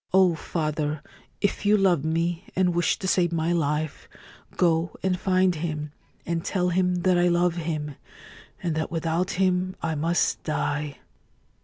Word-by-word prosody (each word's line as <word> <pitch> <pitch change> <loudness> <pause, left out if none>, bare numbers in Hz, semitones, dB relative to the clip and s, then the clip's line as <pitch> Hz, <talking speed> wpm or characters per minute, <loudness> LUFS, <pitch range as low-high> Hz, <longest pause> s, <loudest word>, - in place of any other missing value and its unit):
Oh, 185 -2 +6
father, 155 -2 -2 0.4
if 200 - 0
you 210 +1 +5
love 180 -7 +3
me 165 +3 -1
and 180 -2 +2
wish 175 0 +1
to 190 - -4
save 175 -2 +2
my 165 0 0
life, 155 -2 -1 0.5
go 170 -1 +2
and 185 -1 +1
find 185 -1 +3
him 155 -2 -4 0.3
and 165 -1 -2
tell 180 -2 0
him 180 0 +1
that 185 -1 +4
I 175 - +4
love 175 0 +2
him, 155 -3 -3 0.7
and 170 -3 0
that 160 0 -2
without 165 +2 -1
him 185 0 +1
I 165 -1 -1
must 165 +3 +1
die 150 -2 -2
170 Hz, 155 wpm, -25 LUFS, 160-180 Hz, 0.7 s, Oh